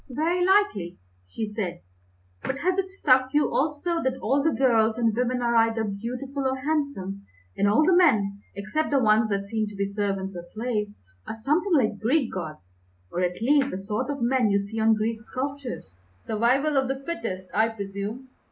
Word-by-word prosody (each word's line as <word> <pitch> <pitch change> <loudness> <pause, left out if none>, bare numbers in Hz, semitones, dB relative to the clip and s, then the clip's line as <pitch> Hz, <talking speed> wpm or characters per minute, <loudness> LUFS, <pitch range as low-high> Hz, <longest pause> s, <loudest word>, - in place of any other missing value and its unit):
"Very 330 +7 0
likely," 370 - +2 0.3
she 215 - -4
said; 180 -5 -3 0.6
"but 265 - -3
has 360 +6 +1
it 380 -1 -1
struck 265 -8 +2
you 295 - +2
also 315 +4 0
that 260 0 -1
all 275 +2 +1
the 320 - +3
girls 230 -6 +2
and 230 -3 +1
women 250 +1 0
are 235 0 +1
either 225 0 +3
beautiful 250 +7 -3
or 260 - 0
handsome, 265 -9 -2 0.3
and 200 - +2
all 220 +10 +4
the 370 - +5
men, 210 - +3
except 215 +11 -2
the 285 - +2
ones 220 -3 +3
that 200 -1 -1
seem 215 +1 -2
to 205 - -9
be 200 0 -1
servants 195 -1 -2
or 175 - -5
slaves, 210 +2 -3 0.3
are - - -4
something 310 - +1
like 220 -7 +2
Greek 255 +3 +1
gods, 155 - -7 0.4
or, 180 - -2
at 180 +4 -1
least, 275 +1 +3
the - - -4
sort 210 +6 -3
of 280 -4 -2
men 245 -2 +2
you 200 - +3
see 200 +3 -4
on 220 0 +4
the - - 0
Greek 220 +1 -2
sculptures?" 255 - -6 0.3
"Survival 255 +7 +2
of 265 -1 +2
the 270 +1 -3
fittest, 190 - -4
I 220 +2 +3
presume. 205 +4 -6
230 Hz, 190 wpm, -25 LUFS, 200-275 Hz, 0.6 s, the